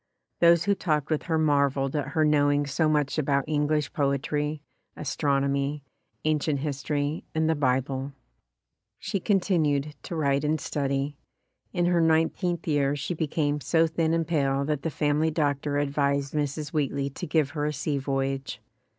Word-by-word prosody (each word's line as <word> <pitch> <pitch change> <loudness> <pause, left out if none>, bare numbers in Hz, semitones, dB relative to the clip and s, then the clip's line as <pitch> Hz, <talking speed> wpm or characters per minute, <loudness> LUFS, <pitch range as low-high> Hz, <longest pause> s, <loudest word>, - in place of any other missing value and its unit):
Those 170 -1 +5
who 200 +2 +2
talked 155 -6 -1
with 155 - +1
her 160 - +2
marveled 140 -2 +2
at 145 -2 -1
her 155 - +4
knowing 145 -1 +3
so 155 +3 +1
much 150 0 +1
about 140 -2 +1
English 150 -1 0
poetry, 145 +1 -1 0.3
astronomy, 140 0 0 0.4
ancient 150 -2 +1
history 145 +1 -2
and 160 0 +2
the 160 - +3
Bible, 135 -1 -1 0.8
She 195 - -3
continued 160 -7 +1
to 175 - -6
write 140 -2 +1
and 155 +1 +1
study. 140 0 -2 0.5
In 175 -1 0
her 175 -1 +3
nine 160 0 +3
teenth 175 -3 -3
year 145 -2 +2
she 145 +5 -3
became 150 -2 -1
so 165 +3 +3
thin 160 0 0
and 165 -1 0
pale 140 -4 +1
that 150 -1 -1
the 165 - -2
family 150 +1 +1
doctor 145 -2 0
advised 140 -1 0
Mrs. 150 0 -2
Wheatley 140 -2 -1
to - - -6
give 150 -3 +1
her 150 -1 -2
a - - 0
sea 145 0 -1
voyage. 135 0 -2
145 Hz, 160 wpm, -26 LUFS, 140-155 Hz, 0.8 s, Those